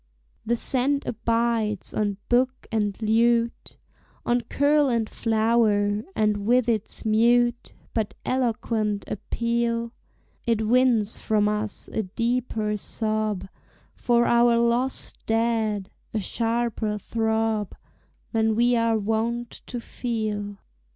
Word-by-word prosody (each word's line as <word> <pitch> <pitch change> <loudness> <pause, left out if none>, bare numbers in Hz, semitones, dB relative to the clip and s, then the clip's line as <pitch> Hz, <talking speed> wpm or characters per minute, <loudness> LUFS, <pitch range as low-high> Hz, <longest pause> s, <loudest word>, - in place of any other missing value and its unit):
The 235 - +1
scent 270 +4 0
abides 230 -2 0
on 205 -2 -1
book 255 +1 +1
and 210 -3 -1
lute, 230 +2 +1 0.5
On 240 0 +2
curl 285 +4 +2
and 230 -3 0
flower, 215 -3 +2
and 210 -1 +2
with 245 0 +3
its 225 -2 -2
mute 235 +2 +2 0.2
But 220 -2 -2
eloquent 225 -4 -1
appeal 235 +2 -1 0.5
It 225 -2 +1
wins 235 -2 +2
from 210 -2 +1
us 210 0 -2
a - - -1
deeper 225 +1 -1
sob 215 -2 -2 0.5
For 240 -1 +2
our 235 0 +4
lost 235 +3 0
dead, 225 -3 0 0.2
a - - +2
sharper 225 0 -1
throb 220 -1 -1 0.6
Than 220 -1 +2
we 240 +2 +3
are 230 -1 +2
wont 225 +3 -1 0.2
to 245 - -4
feel. 215 -4 -3
225 Hz, 110 wpm, -25 LUFS, 215-235 Hz, 0.6 s, our